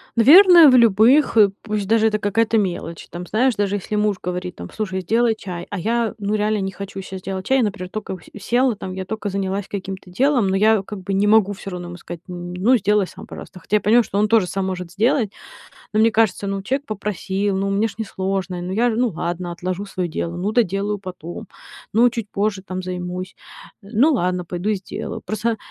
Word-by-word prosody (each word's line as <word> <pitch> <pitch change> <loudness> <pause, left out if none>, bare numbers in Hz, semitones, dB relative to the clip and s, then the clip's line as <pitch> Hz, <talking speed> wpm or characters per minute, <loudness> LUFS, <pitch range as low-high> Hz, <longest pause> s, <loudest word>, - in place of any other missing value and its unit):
Наверное, 335 - +8
в 255 - +5
любых, 235 +4 +5
э, 205 -2 +6
пусть 210 -3 -3
даже 220 0 +3
это 215 -1 +1
какая-то 225 +2 +1
мелочь. 175 -4 -3
Там, 175 +1 -7
знаешь, 245 +3 +2
даже 205 -1 0
если 205 +1 -4
муж 210 -2 +1
говорит 180 0 -4
там: 85 - -9
"Слушай, 190 -3 -3
сделай 225 +4 +2
чай",- 175 -4 -7
а - - -4
я, 230 +3 0
ну, 205 +1 -1
реально 210 0 0
не 190 0 -2
хочу 195 0 -7
щас 190 0 -8
делать 190 0 -5
чай. 265 - +3
Я, - - +3
например, 195 -3 -3
только 215 -1 -5
у 185 - -8
с 200 +2 -13
села 245 +1 +2
там, 190 -2 -7
я 190 0 -5
только 215 +1 -4
занялась 195 0 -2
каким-то 190 -1 -6
делом, 255 +1 +2
но 190 - +1
я 215 0 +4
как 200 0 -8
бы 195 +1 -3
не 200 +2 +2
могу 210 -2 +4
всё 195 +1 -8
равно 180 -1 -6
ему 175 - -8
сказать, 170 -1 -9
м: 175 0 -6
"Ну 205 +8 +3
сделай 210 -2 +2
сам, - - -11
пожалуйста". 185 - -10
Хотя 200 - -2
я 210 - +4
понимаю, 230 +4 +4
что 200 - -4
он 210 +1 +3
тоже 220 -4 +3
сам 195 +1 -2
может 180 -2 -4
сделать. 225 +1 +1 0.6
Но 215 - +2
мне 225 +1 +5
кажется, 215 -3 +1
ну, 195 0 -3
человек 270 +7 -2
попросил, 200 -2 -2
ну, 195 +1 -1
мне 210 +3 +1
ж 200 - -11
не 220 - -2
сложно, 190 -2 -3
ну 180 - -4
я, 235 +5 +2
ну 240 +2 +1
ладно, 175 +1 -4
отложу 185 +3 -4
своё 185 -3 -3
дело, 170 +1 -4
ну, 195 +4 -2
доделаю 205 -2 0
потом, 185 +1 -8 0.5
ну, 235 +3 +5
чуть 230 -3 -5
позже 200 -1 -1
там 185 0 -5
займусь, 180 +1 -5 0.5
ну 235 +10 +2
ладно, 180 -7 0
пойду 180 +5 -2
сделаю. 190 -2 -6
Просто, 220 +1 -2
200 Hz, 220 wpm, -21 LUFS, 185-220 Hz, 0.6 s, Наверное